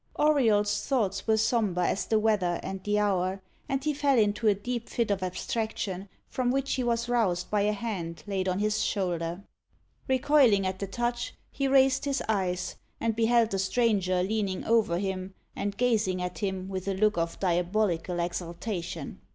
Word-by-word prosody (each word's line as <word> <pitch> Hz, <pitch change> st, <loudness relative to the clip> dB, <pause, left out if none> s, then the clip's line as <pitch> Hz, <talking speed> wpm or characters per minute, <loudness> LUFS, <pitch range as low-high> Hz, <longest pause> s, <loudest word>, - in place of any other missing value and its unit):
Auriol's 225 Hz, -9 st, +2 dB
thoughts 215 Hz, -8 st, 0 dB
were 220 Hz, 0 st, +4 dB
sombre 215 Hz, -5 st, +1 dB
as -, -, -1 dB
the 220 Hz, -, +3 dB
weather 205 Hz, -5 st, +1 dB
and 190 Hz, 0 st, -5 dB
the 210 Hz, 0 st, +1 dB
hour, 190 Hz, -2 st, +1 dB, 0.3 s
and 270 Hz, 0 st, -1 dB
he 305 Hz, 0 st, +1 dB
fell 280 Hz, -2 st, +2 dB
into 210 Hz, 0 st, +2 dB
a 205 Hz, -, +5 dB
deep 235 Hz, +3 st, -4 dB
fit 230 Hz, -3 st, 0 dB
of 195 Hz, -2 st, 0 dB
abstraction, 195 Hz, 0 st, -3 dB, 0.2 s
from 255 Hz, -1 st, -1 dB
which 275 Hz, +1 st, 0 dB
he 260 Hz, -, -1 dB
was 235 Hz, 0 st, 0 dB
roused 205 Hz, -8 st, 0 dB
by 210 Hz, -1 st, +2 dB
a 210 Hz, +1 st, +2 dB
hand 200 Hz, -6 st, -4 dB
laid 190 Hz, -2 st, -1 dB
on 185 Hz, -, 0 dB
his 210 Hz, +1 st, +1 dB
shoulder. 175 Hz, -2 st, -1 dB, 0.6 s
Recoiling 260 Hz, -6 st, +4 dB
at 185 Hz, 0 st, -2 dB
the 200 Hz, -, -3 dB
touch, 240 Hz, +4 st, -2 dB, 0.2 s
he 275 Hz, 0 st, -1 dB
raised 265 Hz, 0 st, +4 dB
his 280 Hz, -2 st, -1 dB
eyes, 185 Hz, -4 st, -1 dB, 0.2 s
and 225 Hz, -1 st, 0 dB
beheld 230 Hz, 0 st, +3 dB
the 195 Hz, -, -1 dB
stranger 190 Hz, -3 st, +1 dB
leaning 200 Hz, -2 st, -1 dB
over 220 Hz, -7 st, +3 dB
him, 190 Hz, 0 st, -3 dB, 0.2 s
and 200 Hz, 0 st, -3 dB
gazing 220 Hz, -7 st, +1 dB
at 180 Hz, 0 st, -4 dB
him 190 Hz, -2 st, -2 dB
with 190 Hz, -1 st, -5 dB
a 195 Hz, -, 0 dB
look 210 Hz, +2 st, +2 dB
of 165 Hz, 0 st, -2 dB
diabolical 180 Hz, -1 st, 0 dB
exultation. 170 Hz, -1 st, -4 dB
205 Hz, 175 wpm, -28 LUFS, 185-230 Hz, 0.6 s, a